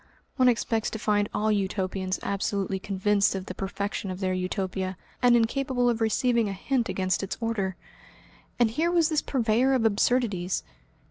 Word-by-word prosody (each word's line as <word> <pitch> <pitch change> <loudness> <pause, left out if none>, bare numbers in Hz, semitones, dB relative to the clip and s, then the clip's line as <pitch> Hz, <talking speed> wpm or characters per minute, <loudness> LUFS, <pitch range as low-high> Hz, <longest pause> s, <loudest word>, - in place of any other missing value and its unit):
One 255 -2 +5
expects 225 -2 0
to - - -5
find 205 -1 +1
all 215 +1 0
Utopians 190 -2 -1
absolutely 195 -1 -1
convinced 200 +1 +1
of 190 -1 -4
the 185 - -6
perfection 195 +1 -4
of 185 0 -5
their 185 -1 0
Utopia, 185 0 -2 0.2
and 245 -1 +6
incapable 245 +1 +1
of 230 -1 -3
receiving 230 0 +2
a - - -3
hint 240 +5 -1
against 185 0 0
its 195 - -4
order. 210 -5 -1 0.8
And 235 -2 +3
here 320 +8 +1
was 340 -3 +3
this 310 -2 +1
purveyor 250 +1 +2
of 250 -4 +2
absurdities! 205 -4 +1
210 Hz, 160 wpm, -27 LUFS, 190-240 Hz, 0.8 s, and